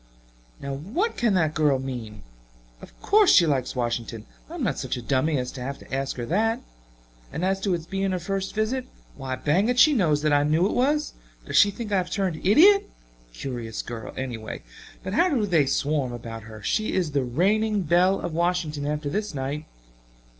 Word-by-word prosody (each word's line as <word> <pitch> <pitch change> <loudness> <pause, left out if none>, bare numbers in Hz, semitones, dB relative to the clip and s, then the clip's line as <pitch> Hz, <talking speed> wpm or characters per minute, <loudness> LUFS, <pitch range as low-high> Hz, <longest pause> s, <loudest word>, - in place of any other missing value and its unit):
"Now 140 0 -5
what 225 - -2
can 230 -5 +1
the 170 -3 +3
girl 150 -2 +2
mean? 120 -5 -6 0.6
Of - - -14
course 415 -1 +5
she 170 - +7
likes 135 -5 -1
Washington 120 -2 -3 0.2
I'm 335 -3 -5
not - - -1
such 130 -1 -3
a - - -5
dummy 140 +5 +1
as 125 -1 -3
to 130 - -8
have 140 +2 -4
to - - -13
ask 135 0 -2
her 120 - -3
that. 225 - +1 0.7
And 160 +5 -2
as 195 0 +1
to 195 -2 0
its 165 -2 -6
being 195 +2 -2
her 185 - -1
first 195 +2 -3
visit, 235 +4 -1 0.3
why 135 -2 -4
bang 160 - +1
it, 250 - +1
she 305 +4 +7
knows 155 - +2
that 150 -1 +2
I 145 - +4
knew 155 +4 +2
it 205 - 0
was. 295 +4 +1 0.3
Does - - -5
she 205 - +7
think 210 +1 -6
I 200 - +3
have 180 -1 -1
turned 190 -6 -2
idiot? 360 - +6 0.4
Curious 115 - -5
girl, 115 -2 -7
anyway. 120 -4 -5 0.4
But 185 - -4
how 285 - +2
they 170 -7 +3
do - - -7
swarm 140 -3 0
about 115 -2 -8
her! 110 -1 -11
She 215 0 0
is 180 -5 0
the 140 -2 +1
reigning 200 - +1
belle 180 +4 +3
of 165 - -4
Washington 165 -4 -1
after 150 0 -2
this 205 +3 -3
night. 140 +3 -3
160 Hz, 200 wpm, -25 LUFS, 135-205 Hz, 0.7 s, she